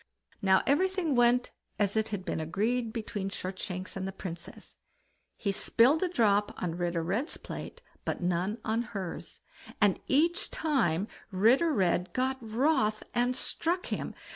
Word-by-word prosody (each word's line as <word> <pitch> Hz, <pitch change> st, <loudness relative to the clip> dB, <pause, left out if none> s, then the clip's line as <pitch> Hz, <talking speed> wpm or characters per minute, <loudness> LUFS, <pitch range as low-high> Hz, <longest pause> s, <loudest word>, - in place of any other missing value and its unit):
Now 190 Hz, -1 st, +4 dB
everything 360 Hz, +2 st, +2 dB
went 245 Hz, 0 st, +3 dB, 0.3 s
as 205 Hz, -1 st, +1 dB
it 220 Hz, 0 st, +1 dB
had 200 Hz, -3 st, -4 dB
been -, -, -2 dB
agreed 220 Hz, +9 st, 0 dB
between 210 Hz, -4 st, -4 dB
Shortshanks 185 Hz, -1 st, -4 dB
and 190 Hz, 0 st, -3 dB
the -, -, -3 dB
Princess; 175 Hz, -2 st, -8 dB, 0.6 s
he 200 Hz, -, -1 dB
spilled 235 Hz, +8 st, +4 dB
a 370 Hz, -, +1 dB
drop 210 Hz, -, +2 dB
on 175 Hz, -2 st, -2 dB
Ritter 175 Hz, -1 st, -1 dB
Red's 215 Hz, -, 0 dB
plate, 485 Hz, -, -8 dB, 0.2 s
but -, -, -2 dB
none 180 Hz, +4 st, 0 dB
on 220 Hz, +2 st, +1 dB
hers, 195 Hz, -6 st, -6 dB, 0.4 s
and 205 Hz, -3 st, +3 dB
each 340 Hz, +8 st, +2 dB
time 215 Hz, -, +1 dB, 0.2 s
Ritter 230 Hz, -, +4 dB
Red 180 Hz, -, +1 dB
got 260 Hz, +1 st, 0 dB
wroth 225 Hz, -1 st, +1 dB
and 245 Hz, +1 st, +2 dB
struck 345 Hz, +7 st, -1 dB
him. -, -, -4 dB
215 Hz, 145 wpm, -30 LUFS, 190-260 Hz, 0.6 s, Now